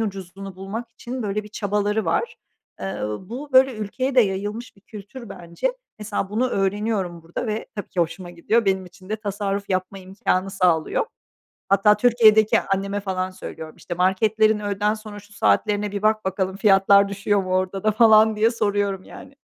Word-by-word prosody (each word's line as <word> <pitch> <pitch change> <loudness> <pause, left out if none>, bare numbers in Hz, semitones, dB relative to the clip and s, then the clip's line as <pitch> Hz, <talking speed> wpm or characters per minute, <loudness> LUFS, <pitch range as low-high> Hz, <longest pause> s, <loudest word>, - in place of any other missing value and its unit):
ucuzunu 195 -2 -6
bulmak 220 +5 -6
için 245 +2 -6
böyle 210 +1 -2
bir 210 - -12
çabaları 210 +1 -1
var. 470 - -1 0.4
Eee, 195 - -4
uuu, 105 - -5
bu, 275 +5 -7
böyle 260 -1 +5
ülkeye 250 +6 -3
de 255 - +7
yayılmış 205 +3 -2
bir 195 - -21
kültür 215 +3 -11
bence. 175 - -3 0.3
Mesela, 205 -2 -3
bunu 245 +4 +1
öğreniyorum 195 -4 -1
burada 165 +7 -5
ve 215 0 -3
tabii 205 - -5
ki 180 - -2
hoşuma 175 +2 -3
gidiyor. 215 +7 0
Benim 190 -1 0
için 185 +1 -16
de 215 - -1
tasarruf 200 -1 -3
yapma 185 +1 -2
imkânı 190 0 -2
sağlıyor. 180 - +1 0.6
Hatta 200 +2 +4
Türkiye'deki 220 -2 +5
anneme 195 +1 -2
falan 185 -2 -2
söylüyorum, 160 -3 -9
işte, 175 - -6
“Marketlerin 210 +4 +2
öğleden 205 +1 0
sonra 215 -1 -9
şu 205 0 -18
saatlerine 205 0 +1
bir 200 - -4
bak 215 0 +1
bakalım, 190 0 -1
fiyatlar 200 -1 +5
düşüyor 200 0 0
mu 185 0 -1
orada 185 +1 -1
da?” 215 - +3
falan 220 0 +5
diye 220 +2 +3
soruyorum, 205 -4 -1
yani. 275 - -13
205 Hz, 170 wpm, -23 LUFS, 190-215 Hz, 0.6 s, de